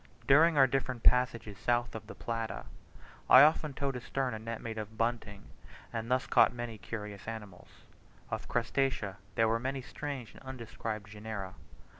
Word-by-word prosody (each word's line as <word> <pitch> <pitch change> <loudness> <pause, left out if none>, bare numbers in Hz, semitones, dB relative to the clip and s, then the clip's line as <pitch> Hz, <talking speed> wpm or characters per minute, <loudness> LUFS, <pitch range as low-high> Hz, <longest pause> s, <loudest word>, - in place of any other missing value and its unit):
During 155 +3 +6
our 135 - +8
different 130 -2 -2
passages 120 -5 +3
south 120 0 +1
of 110 -1 -7
the - - -9
Plata, 115 - -4 0.6
I 130 - +11
often 155 -2 +3
towed 140 -2 -1
astern 125 +1 -2
a 110 - -4
net 115 +1 -5
made 110 -1 -5
of 110 +1 -7
bunting, 115 -4 -2 0.5
and 115 0 -3
thus 130 +1 +2
caught - - +5
many 120 -2 -6
curious 105 -2 -7
animals. 105 -5 -8 0.6
Of - - -3
Crustacea 120 -4 0 0.2
there 115 - +4
were 115 +1 +2
many 135 +1 -3
strange 135 -4 -6
and - - -15
undescribed 115 -5 -6
genera. 105 -3 -6
115 Hz, 160 wpm, -32 LUFS, 110-130 Hz, 0.6 s, I